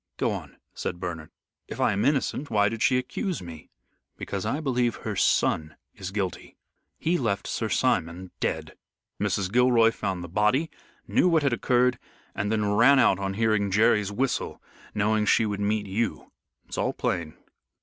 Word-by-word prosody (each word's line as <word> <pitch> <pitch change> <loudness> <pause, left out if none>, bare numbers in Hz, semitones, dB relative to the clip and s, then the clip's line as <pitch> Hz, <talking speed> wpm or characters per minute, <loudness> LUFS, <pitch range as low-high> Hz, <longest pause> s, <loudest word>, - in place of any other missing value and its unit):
"Go - - +1
on," - - -7 0.2
said 90 - -4
Bernard. 80 -3 -5 0.4
"If - - -8
I - - +3
am 100 - 0
innocent, 140 0 0
why 105 -2 +3
did 115 0 -6
she 130 - +4
accuse 175 - -3
me?" 85 -3 -10 0.5
"Because - - -4
I 145 - -1
believe 125 -5 0
her - - -5
son 75 -1 +1 0.2
is 95 - -6
guilty. 95 -3 -4 0.4
He 175 +2 0
left 100 -5 -1
Sir 110 - -2
Simon 90 -4 0
dead. - - -3 0.4
Mrs. 100 -2 -1
Gilroy 120 -1 +5
found 95 -5 -3
the - - -6
body, 105 - +1 0.4
knew 180 - +3
what 160 -3 +3
had 140 -3 +2
occurred, 125 +2 +2 0.3
and 105 0 -2
then 105 -2 +1
ran 120 +7 +6
out 120 -7 +4
on 95 0 -3
hearing 110 -2 +1
Jerry's 105 0 +3
whistle 125 +5 -2 0.4
knowing 105 +1 +1
she 115 - +4
would 105 -1 -3
meet 105 +1 0
you. 105 +3 -3 0.3
It's - - -6
all - - 0
plain." 80 -3 -2
105 Hz, 170 wpm, -26 LUFS, 95-125 Hz, 0.5 s, ran